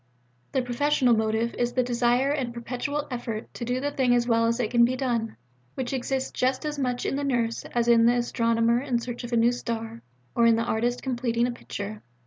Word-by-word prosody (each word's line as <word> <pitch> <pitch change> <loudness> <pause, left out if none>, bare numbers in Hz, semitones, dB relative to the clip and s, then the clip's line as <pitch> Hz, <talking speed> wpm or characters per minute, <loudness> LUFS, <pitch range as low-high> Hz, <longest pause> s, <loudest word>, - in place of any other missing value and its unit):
The 265 - +1
professional 250 0 +2
motive 220 +1 0
is 240 0 0
the 255 - +2
desire 245 +2 +2
and 265 -5 -1
perpetual 265 +5 -3
effort 230 -3 -5
to - - -6
do 245 +2 -1
the 285 +2 -2
thing 255 -3 +2
as 240 0 +1
well 230 -1 +3
as 230 +1 0
it 220 -3 -1
can 240 -1 +5
be 250 +2 +3
done, 240 -4 -2 0.4
which 260 0 -3
exists 265 +1 -2
just 260 +3 0
as 300 -1 -3
much 250 -2 -1
in 270 - -1
the 285 - -2
Nurse, 240 -4 -1
as 240 -1 -1
in 230 -1 +6
the 240 - +4
Astronomer 230 0 +1
in 260 -3 0
search 240 +1 -5
of 240 - -6
a 235 - +2
new 230 +1 +4
star, 230 -2 -4 0.3
or 235 0 +4
in 230 - +5
the 230 - 0
Artist 240 +1 -1
completing 240 -2 0
a 250 - -1
picture. 210 -3 -7
240 Hz, 220 wpm, -26 LUFS, 230-255 Hz, 0.4 s, in